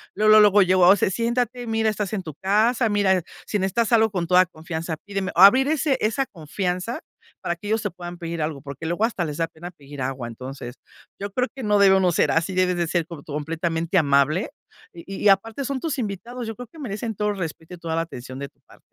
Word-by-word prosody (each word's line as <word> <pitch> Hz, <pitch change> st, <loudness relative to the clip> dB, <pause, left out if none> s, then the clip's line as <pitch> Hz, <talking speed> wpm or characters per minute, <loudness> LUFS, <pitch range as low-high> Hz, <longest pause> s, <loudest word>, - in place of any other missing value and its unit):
luego, 215 Hz, +1 st, +6 dB
luego 205 Hz, -1 st, +6 dB
yo, 185 Hz, 0 st, +2 dB
o 180 Hz, +2 st, +7 dB
sea: 190 Hz, -, +1 dB
"Siéntate. 240 Hz, +2 st, -1 dB
Mira, 225 Hz, 0 st, +1 dB
estás 210 Hz, -1 st, -4 dB
en 195 Hz, -3 st, -2 dB
tu 155 Hz, -, -7 dB
casa, 220 Hz, -, +2 dB
mira, 195 Hz, -3 st, +2 dB, 0.2 s
si 210 Hz, -, -1 dB
necesitas 200 Hz, +5 st, 0 dB
algo 220 Hz, -1 st, +5 dB
con 180 Hz, -4 st, -2 dB
toda 180 Hz, +1 st, +5 dB
confianza, 160 Hz, 0 st, -5 dB
pídeme". 195 Hz, -2 st, -3 dB
Abrir 220 Hz, +9 st, +7 dB
ese 300 Hz, -3 st, +1 dB
esa 225 Hz, +5 st, +1 dB
confianza 180 Hz, -, -4 dB, 0.4 s
para 175 Hz, -, -2 dB
que 205 Hz, -, -9 dB
ellos 220 Hz, +1 st, +1 dB
te 205 Hz, -, -2 dB
puedan 175 Hz, 0 st, -8 dB
pedir 170 Hz, -1 st, -5 dB
algo, 150 Hz, -2 st, -3 dB
porque 140 Hz, +2 st, -8 dB
luego 175 Hz, +6 st, -1 dB
hasta 225 Hz, -6 st, -2 dB
les 150 Hz, -2 st, -5 dB
da 165 Hz, -, 0 dB
pena 165 Hz, +2 st, -10 dB
pedir 145 Hz, -4 st, -11 dB
agua. 130 Hz, -1 st, -3 dB
Entonces, 125 Hz, +1 st, -8 dB, 0.4 s
yo 200 Hz, 0 st, -5 dB
creo 250 Hz, +4 st, 0 dB
que 270 Hz, -, -7 dB
no 210 Hz, -1 st, +3 dB
debe 195 Hz, -1 st, +6 dB
uno 185 Hz, -2 st, +3 dB
ser -, -, +2 dB
así, 170 Hz, +3 st, 0 dB
debes 180 Hz, -1 st, +2 dB
de 170 Hz, -1 st, 0 dB
ser 170 Hz, 0 st, 0 dB
corto 155 Hz, -3 st, -9 dB
completamente 165 Hz, +3 st, -1 dB
amable. 145 Hz, +4 st, +2 dB, 0.4 s
Y 170 Hz, -, -11 dB, 0.2 s
y -, -, +7 dB
aparte 225 Hz, +7 st, +1 dB
son 275 Hz, 0 st, -2 dB
tus 310 Hz, -4 st, -2 dB
invitados, 235 Hz, +3 st, -5 dB
yo 225 Hz, -, -5 dB
creo 245 Hz, +2 st, -9 dB
que 315 Hz, +8 st, -16 dB
merecen 225 Hz, -3 st, -4 dB
todo 210 Hz, +1 st, 0 dB
respeto 165 Hz, -3 st, -6 dB
y -, -, -15 dB
toda 165 Hz, -1 st, -3 dB
la 165 Hz, -, +1 dB
atención 130 Hz, -4 st, -9 dB
de 140 Hz, 0 st, -5 dB
tu -, -, -43 dB
par -, -, -20 dB
185 Hz, 230 wpm, -23 LUFS, 165-220 Hz, 0.4 s, o